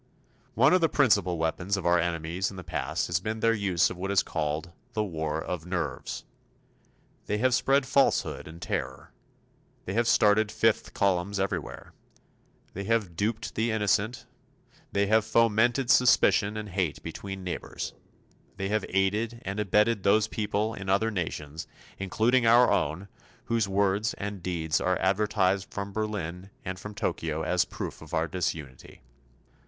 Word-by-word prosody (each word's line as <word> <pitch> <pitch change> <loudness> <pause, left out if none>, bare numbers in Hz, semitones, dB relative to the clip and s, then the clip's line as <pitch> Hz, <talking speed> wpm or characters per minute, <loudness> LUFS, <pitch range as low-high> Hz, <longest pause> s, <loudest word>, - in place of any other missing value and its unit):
One - - +5
of 185 - +4
the 165 - +3
principal 100 - +3
weapons 85 +5 -1
of 95 - -5
our 85 0 +4
enemies 85 +2 -1
in 95 - -10
the 90 - -7
past 80 +2 -2
has 85 0 0
been 110 +3 -4
their 115 +1 +3
use 95 -5 +1
of 90 - -7
what 95 +2 -4
is 100 -1 +3
called 80 +1 -3 0.2
"The 110 -2 0
War 80 -5 -3
of 85 0 -5
Nerves." 85 -8 -3 1.0
They 105 - 0
have 130 +3 +2
spread 135 +3 +3
falsehood 135 +1 +1
and 80 +2 -10
terror; 65 -6 -4 0.7
they 95 - -4
have 115 +2 +1
started 105 -1 +4
Fifth 115 -1 +1
Columns 100 0 +1
everywhere; 95 -4 -4 0.8
they 100 +1 -5
have 105 -6 0
duped 110 +2 -2
the 115 +2 0
innocent; 110 +1 0 0.7
they 100 0 +2
have 110 +2 +3
fomented 115 +3 +3
suspicion 110 -4 +4
and 105 -1 -5
hate 90 -5 -2
between 95 +3 -6
neighbors; 90 - -5 0.6
they 95 0 -2
have 105 -1 0
aided 105 +5 0
and 100 +2 -3
abetted 105 +2 +2
those 105 +3 +3
people 110 0 -1
in 95 -4 -6
other 110 +4 +2
nations 80 -5 -4 0.3
including 115 +6 +2
our 120 +2 +6
own 80 +7 0 0.4
whose 115 -3 +1
words 100 +2 +1
and 100 -1 -5
deeds 85 -3 -1
are 90 -1 +1
advertised 95 0 +1
from 100 0 -5
Berlin 95 -4 -4 0.2
and 95 0 -4
from 105 +1 -8
Tokyo 80 -4 -2
as 90 0 +2
proof - - -6
of - - -6
our 80 +1 +1
disunity. 75 -6 -5
100 Hz, 155 wpm, -28 LUFS, 90-110 Hz, 1.0 s, our